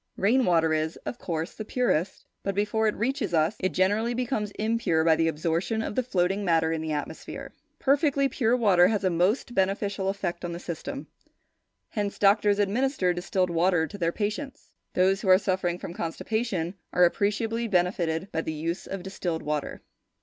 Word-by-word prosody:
Rain 240 +6 +3
water 165 -2 +3
is, 155 +1 -1
of 245 - -5
course, 165 -1 -3
the 215 - -6
purest, 210 -7 -1 0.2
but, 195 -1 -2
before 210 +2 +1
it 210 - 0
reaches 235 -5 -1
us, 160 +6 +2
it 185 - +1
generally 210 +6 +1
becomes 240 -4 -1
impure 215 -7 +1
by 160 -1 +5
the 165 +1 +1
absorption 165 +8 -1
of - - -4
the 255 - +1
floating 195 -4 0
matter 165 -3 +2
in 160 -1 -1
the 160 0 -3
atmosphere. 145 -1 -5 0.2
Perfectly 280 0 +2
pure 245 -3 +1
water 190 -7 +5
has 210 0 0
a 185 - +2
most 185 +9 +1
beneficial 195 0 0
effect 185 -3 -3
on 175 -1 -3
the 170 - -5
system; 190 - -6 0.8
hence 205 -2 -3
doctors 205 0 +4
administer 205 -1 +1
distilled 180 0 -1
water 170 0 +2
to 160 - -9
their 170 -1 +1
patients. 215 +8 -4 0.2
Those 190 +2 +3
who 195 - -1
are 185 - +8
suffering 185 -3 -1
from 175 - -7
constipation 185 +1 -2 0.2
are 180 - +5
appreciably 225 +5 0
benefitted 180 -2 0
by 160 - -1
the 160 - -4
use 165 +3 -3
of 195 -2 -5
distilled 180 -3 -3
water. 150 -1 -3
190 Hz, 180 wpm, -27 LUFS, 170-220 Hz, 0.8 s, are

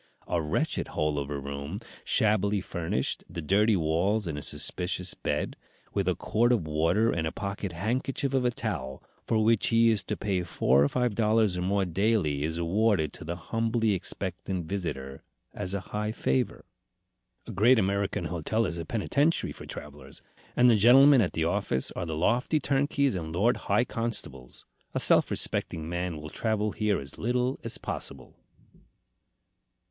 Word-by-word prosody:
A 85 - 0
wretched 75 -1 -1
hole 75 -1 -1
of 70 0 -4
a 75 - -3
room, 70 +5 -5 0.3
shabbily 105 -1 +2
furnished, 80 -7 -2
the 85 +1 -6
dirty 100 +7 +3
walls 90 +6 +1
and 80 -3 -3
a 75 - -5
suspicious 90 +3 -2
bed, - - -2 0.4
with 100 -2 0
a 90 - +2
quart 120 +3 +1
of 110 -10 +1
water 85 +9 +2
and 80 -1 -1
a - - -3
pocket 100 0 -4
handkerchief 125 +8 -2
of 130 -1 +2
a 125 - +3
towel, 80 - -4 0.2
for 110 -1 +2
which 115 0 +3
he 115 0 +5
is 105 -4 +1
to - - -3
pay 100 -3 -1
four 70 -5 +2
or 70 - +2
five 125 -3 0
dollars 110 -2 +2
or 90 - -2
more 95 +2 +1
daily, 95 -5 +1
is 80 +2 -2
awarded 90 -2 +1
to - - -8
the 85 +2 -4
humbly 115 +4 0
expectant 95 -1 -4
visitor 75 -7 -4 0.3
as 90 +2 -3
a - - -1
high 105 +1 -1
favor. 65 - -1 0.8
A - - -7
great 120 +7 +5
American 100 -1 0
hotel 90 +7 -1
is 85 - -3
a 85 - -5
penitentiary 140 - 0
for - - -10
travellers, - - -10 0.3
and 125 - +5
the 120 - +6
gentlemen 130 +5 +7
at 95 - 0
the 80 - 0
office 85 -7 -1
are 90 - -4
the 80 -1 -3
lofty 120 - +2
turnkeys 140 -1 +1
and 80 -4 -4
lord 105 +9 +2
high 120 - +3
constables. 110 - -5 0.3
A - - +2
self - - +4
respecting 80 -1 -1
man 85 -1 -3
will 75 0 -8
travel 110 -2 -1
here 105 -2 0
as 70 0 -10
little 125 +3 0
as - - -3
possible." 65 -2 -6
100 Hz, 170 wpm, -28 LUFS, 80-115 Hz, 0.8 s, gentlemen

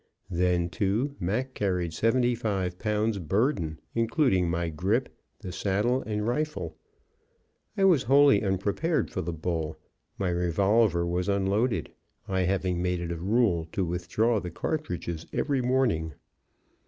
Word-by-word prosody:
Then, 90 -1 +1
too, 110 +10 0
Mac 120 +9 -1
carried 90 -6 -1
seventy 120 +7 +2
five 95 -6 -2
pounds 105 -1 0
burden, 90 - 0
including 115 - +2
my 85 0 -1
grip, 100 - -1 0.3
the 95 -4 -6
saddle 105 +8 0
and 105 -1 -1
rifle. 120 - -2 1.0
I 195 - +2
was 180 -8 +5
wholly 140 -1 +5
unprepared 100 - 0
for 95 - -2
the 85 0 -3
bull; 80 -1 -3 0.4
my 95 -2 0
revolver 90 +2 +2
was 90 +3 -1
unloaded, 100 +5 +1 0.4
I 95 -1 0
having 90 -1 0
made 90 -1 0
it 85 0 -4
a - - -2
rule 95 -3 +1
to 95 - 0
withdraw 90 +7 0
the 90 - -5
cartridges 85 - -4
every 140 -3 0
morning. 120 - +1
95 Hz, 135 wpm, -27 LUFS, 85-115 Hz, 1.0 s, was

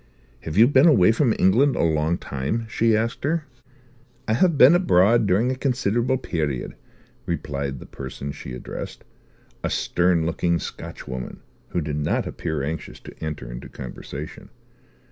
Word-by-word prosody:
"Have 80 +3 -6
you 115 +3 +8
been 140 +3 +5
away 110 - +6
from 120 +1 +2
England 130 +9 +4
a - - +1
long 80 +1 +1
time," 70 - -3
she 115 -1 +2
asked 115 +1 -2
her. 155 +2 0 0.8
"I 110 - +2
have 165 +6 +3
been 135 +4 +8
abroad 115 - +4
during 105 +7 +2
a - - -1
considerable 125 -1 0
period," 75 - -3 0.5
replied 70 -1 -3
the - - -10
person 70 +1 -7
she 65 - -8
addressed, 60 - -7 0.6
a - - 0
stern 85 -2 +1
looking 85 +1 +1
Scotchwoman 65 -5 -7 0.3
who 85 - -1
did 75 -1 -3
not 75 0 0
appear 80 -4 -3
anxious 80 +3 -5
to - - -11
enter 75 -6 -5
into - - -8
conversation. 70 +4 -8
90 Hz, 150 wpm, -23 LUFS, 75-120 Hz, 0.8 s, you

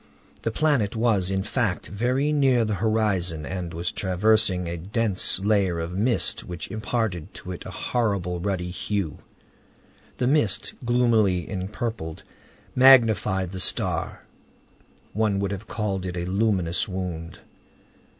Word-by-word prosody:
The - - -1
planet 120 -4 +1
was, 110 -5 +2
in 95 0 0
fact, 105 -2 -1
very 125 +8 0
near 130 -5 +3
the 105 - -1
horizon 100 -7 0
and 90 -3 -4
was 85 +1 -2
traversing 95 -1 +2
a 85 - -3
dense 100 +2 0
layer 100 -4 +1
of 85 +2 -4
mist 115 +6 +1
which 85 +1 -6
imparted 110 -5 -2
to 90 - -8
it 90 - -7
a - - -6
horrible 100 -7 -1
ruddy 90 -1 -2
hue. 95 -3 -3 1.0
The 125 - 0
mist, 130 -7 +1
gloomily 115 -7 +2
empurpled, 95 -3 -4 0.5
magnified 110 -8 +5
the 95 - -5
star. - - -1 0.9
One 105 -1 +1
would 100 0 -1
have 100 +2 -6
called 100 -4 -2
it 90 0 -5
a 85 - -2
luminous 95 -3 +1
wound. 90 -4 -5
100 Hz, 130 wpm, -25 LUFS, 90-115 Hz, 1.0 s, magnified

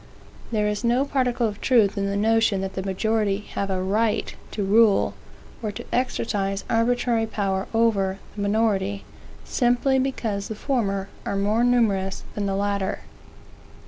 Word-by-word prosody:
There 210 -2 +1
is 210 +2 -2
no 240 +3 +2
particle 255 -4 +1
of 205 -1 -6
truth 225 -6 +3
in 200 -1 -1
the 200 0 -1
notion 220 -2 +2
that 190 0 -4
the 190 - -3
majority 200 +1 0
have 200 - -2
a 185 -1 -1
right 210 +3 0 0.2
to 205 - -3
rule, 210 +1 +4 0.5
or 215 -2 -2
to - - -8
exercise 205 -6 -1
arbitrary 230 0 +2
power 195 -3 -1
over, 205 -4 +2 0.2
the 205 - -4
minority, 200 -1 0 0.4
simply 250 +2 +2
because 225 -7 -2
the 220 - -5
former 205 -6 -1 0.2
are 200 - -2
more 210 +4 +2
numerous 210 -6 +1
than 205 -1 -2
the 195 - -1
latter. 200 -1 -1
210 Hz, 150 wpm, -24 LUFS, 195-230 Hz, 0.5 s, rule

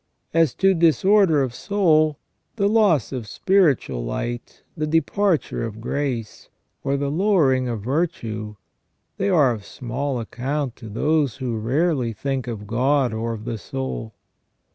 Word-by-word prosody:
As 165 -6 +3
to 195 0 +4
disorder 170 -1 +4
of 125 -3 -3
soul, 155 - +2 0.4
the 200 -3 +2
loss 205 - +3
of 125 -5 -5
spiritual 145 - +2
light, 120 - -5
the 155 -2 -2
departure 165 +3 +1
of 110 -1 -5
grace, 125 -2 -3 0.3
or 140 +1 0
the 140 0 -1
lowering 150 -8 +2
of 115 -4 -3
virtue, 110 - -2 0.6
they 195 - 0
are 150 -9 +4
of 110 -3 -5
small 130 +3 -4
account 130 +3 -3
to 115 - -10
tho^e 145 +4 +1
who 125 -4 -3
rarely 125 +2 0
think 135 +3 -3
of 110 -4 -5
God 125 +3 +1
or 115 +1 -2
of 110 -1 -8
the 115 -2 -4
soul. 130 -5 -5
135 Hz, 140 wpm, -22 LUFS, 115-160 Hz, 0.6 s, to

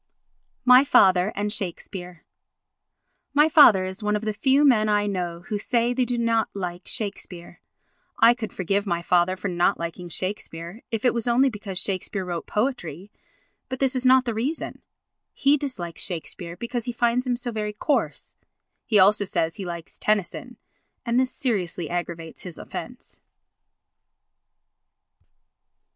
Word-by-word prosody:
My 250 +1 +8
Father 190 -7 +4
and 205 +1 -1
Shakespeare 180 -3 -6 1.1
My 295 +2 +6
father 240 -12 +7
is 190 +3 -6
one 210 0 0
of 210 - -3
the 215 - -1
few 270 +7 +3
men 215 -6 +4
I 205 0 +2
know 175 -4 -3
who 205 +3 -4
say 240 +2 +1
they 250 0 +1
do 245 0 -2
not 230 -2 +1
like 180 -2 -5
Shakespeare. 180 -6 -5 0.6
I 230 +1 +7
could 235 -3 -6
forgive 200 +3 -1
my 170 -2 -1
father 180 +2 +2
for 185 - -4
not 175 +1 +1
liking 170 +1 -6
Shakespeare 180 +1 -5
if 225 +1 -3
it 245 - +4
was 235 0 -2
only 255 +3 +4
because 200 -3 -6
Shakespeare 190 0 -2
wrote 175 -2 -4
poetry; 210 - -3 0.6
but 260 - -3
this 265 0 0
is 255 - 0
not 260 0 +5
the 235 - -1
reason. 260 +9 -3 0.5
He 280 +1 +3
dislikes 255 - -5
Shakespeare 170 0 -6
because 235 +2 -4
he 245 - -2
finds 240 +2 +1
him 245 - +1
so 240 0 -4
very 210 -1 -3
coarse. 290 +7 -2 0.5
He 220 - +3
also 205 +2 +5
says 165 -3 -1
he 195 - -5
likes 170 -1 -8
Tennyson 210 -4 -1 0.5
and 235 +1 +2
this 260 -1 +2
seriously 180 - -2
aggravates 170 -2 -5
his 175 -4 -8
offence. - - -8
210 Hz, 155 wpm, -24 LUFS, 180-240 Hz, 1.1 s, My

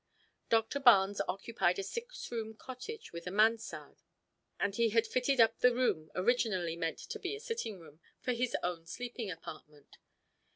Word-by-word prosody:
Doctor 225 +5 +2
Barnes 205 -7 +6
occupied 190 -1 0
a 195 - -2
six 465 - -6
room 220 -2 -4
cottage 260 - -8
with 170 +1 -7
a - - 0
mansard, 220 +4 +1 0.6
and 200 - +1
he 230 0 +3
had 230 +1 +3
fitted 255 +3 +1
up 225 -1 +5
the 250 -1 +5
room 185 -11 +1
originally 185 -5 +1
meant 165 -1 -2
to 440 0 -7
be 390 +1 -3
a - - -8
sitting 455 - -4
room, 155 -2 -15 0.2
for 250 - -1
his 245 +1 0
own 170 -2 -3
sleeping 240 0 -5
apartment. 155 -3 -10
225 Hz, 165 wpm, -33 LUFS, 180-250 Hz, 0.6 s, Barnes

